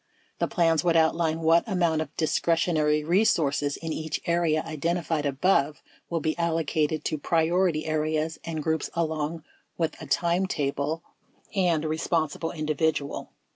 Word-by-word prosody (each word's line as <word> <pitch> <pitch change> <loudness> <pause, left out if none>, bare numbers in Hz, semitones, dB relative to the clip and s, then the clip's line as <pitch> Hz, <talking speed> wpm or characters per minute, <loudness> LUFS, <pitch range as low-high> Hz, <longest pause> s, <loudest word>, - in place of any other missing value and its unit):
The - - +1
plans 165 -3 +2
would 170 -1 +3
outline 160 0 +2
what 165 +1 +4
amount 170 -6 +1
of 155 - -7
discretionary 155 -1 +1
resources 150 -5 +2
in 165 -1 -4
each 155 0 -3
area 170 -2 +1
identified 160 -1 -1
above 145 0 +1 0.3
will 165 -2 -1
be 155 +1 0
allocated 160 -2 0
to 155 - -1
priority 165 +1 +1
areas 155 0 -1
and 160 -2 -4
groups 160 -1 -1
along 160 -1 -2 0.3
with 165 -2 -1
a - - -7
timetable 165 -3 0 0.5
and 175 -6 +1
responsible 160 0 -1
individual. 155 -2 -1
160 Hz, 130 wpm, -26 LUFS, 155-170 Hz, 0.5 s, what